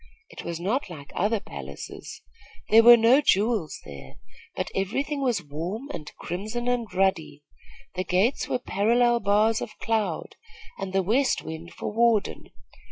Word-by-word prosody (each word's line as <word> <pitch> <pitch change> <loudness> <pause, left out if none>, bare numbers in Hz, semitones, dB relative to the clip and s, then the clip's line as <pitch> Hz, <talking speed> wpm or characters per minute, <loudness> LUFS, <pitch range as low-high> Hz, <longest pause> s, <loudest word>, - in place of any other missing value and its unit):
It - - -9
was 170 -1 -5
not 210 +6 -1
like 145 -5 -10
other 210 +4 +1
palaces. - - -9 0.5
There 225 +1 +8
were 240 +1 +9
no 235 +5 +5
jewels 210 - +1
there; 70 -2 -11 0.4
but - - -3
every 195 +8 -1
thing 290 -1 -4
was 240 -9 0
warm 175 - -5
and 150 -1 -7
crimson 215 +8 -4
and 245 -3 -1
ruddy. 180 -6 0 0.5
The 185 - -2
gates 190 +9 +1
were - - 0
parallel 240 +1 +2
bars 215 +2 +2
of 215 - -7
cloud, 225 -2 -2 0.4
with 195 -1 -4
the 195 0 +2
west 255 +8 +1
wind 160 +2 -8
for - - -5
warden. 230 -2 +1
210 Hz, 155 wpm, -26 LUFS, 180-235 Hz, 0.5 s, were